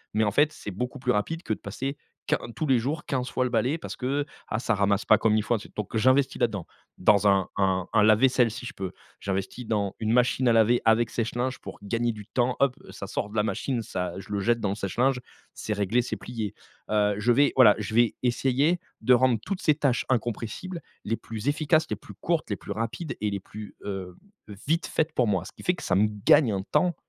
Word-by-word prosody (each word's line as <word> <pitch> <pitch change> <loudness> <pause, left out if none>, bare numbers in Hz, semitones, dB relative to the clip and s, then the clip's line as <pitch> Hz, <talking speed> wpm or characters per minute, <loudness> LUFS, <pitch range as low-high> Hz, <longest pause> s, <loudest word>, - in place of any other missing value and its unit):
mais 110 - +3
en 105 - +1
fait, 145 +6 +3
c'est 105 - -8
beaucoup 125 +8 -4
plus 125 -1 0
rapide 160 +11 -1
que 110 - -1
de - - -6
passer 135 +8 -4 0.3
quin - - +1 0.2
tous 155 - -2
les 130 -4 +3
jours 150 +6 -3
15 130 -5 -2
fois 130 - 0
le 125 - -1
balai 125 +7 +1
parce - - -7
que 140 +3 -1 0.2
ah 110 - -2
ça 120 -2 0
ramasse 100 0 +1
pas 110 - +5
comme 110 -1 +3
il 105 - +1
faut. 120 - +1 0.2
Donc 105 +1 -5
j'investis 130 +4 +3
là-dedans, 110 -7 0 0.3
dans 100 +2 +4
un 100 -1 +3
un 95 -2 +1
un 110 - +5
lave-vaisselle 120 +3 +4
si 115 +3 -7
je - - -6
peux. 95 -2 -5 0.3
J'investis 100 +5 -4
dans 100 -3 -1
une 110 -1 0
machine 125 +1 +3
à 120 - +5
laver 115 +2 +4
avec 110 0 +3
sèche-linge 120 +3 -2
pour - - -9
gagner 115 +3 0
du 105 -2 -9
temps, 125 +2 0
hop, 140 -2 +3
ça - - -7
sort 105 - -3
de 105 - -11
la 105 - +2
machine, 115 +4 -2
ça 90 -4 -3
je 100 - -9
le 100 - 0
jette 115 +3 +2
dans 100 - 0
le 100 - -1
sèche-linge, 125 +6 0 0.3
c'est 105 - -3
réglé, 105 +4 +1
c'est - - -4
plié. 110 -4 -5 0.3
Heu, 105 -1 +2
je 120 +3 +3
vais 145 +4 +4
voilà, 115 -6 +7
je 110 0 -5
vais 120 -1 +4
essayer 135 +7 +2 0.2
de 125 +3 +5
rendre 125 -1 +4
toutes 195 -2 -3
ces 155 - +3
tâches 140 -5 +1
incompressibles 125 - -2 0.2
les 115 +2 -1
plus 115 +2 -7
efficaces, 155 +2 +2
les - - -1
plus - - -13
courtes, 170 -5 -1
les 100 - 0
plus - - -9
rapides 115 - -3
et 105 - +1
les 100 - -2
plus, 105 +2 -10
heu, 95 -3 -5 0.5
vite 165 +3 +1
faites 160 0 -1
pour 125 -5 +2
moi. 95 -3 0
Ce - - -9
qui - - -14
fait 180 - +2
que - - -10
ça 90 - -1
me 105 +2 +4 0.2
gagne 125 -8 +6
un 95 -1 -2
temps 175 - +1
115 Hz, 235 wpm, -26 LUFS, 105-130 Hz, 0.5 s, voilà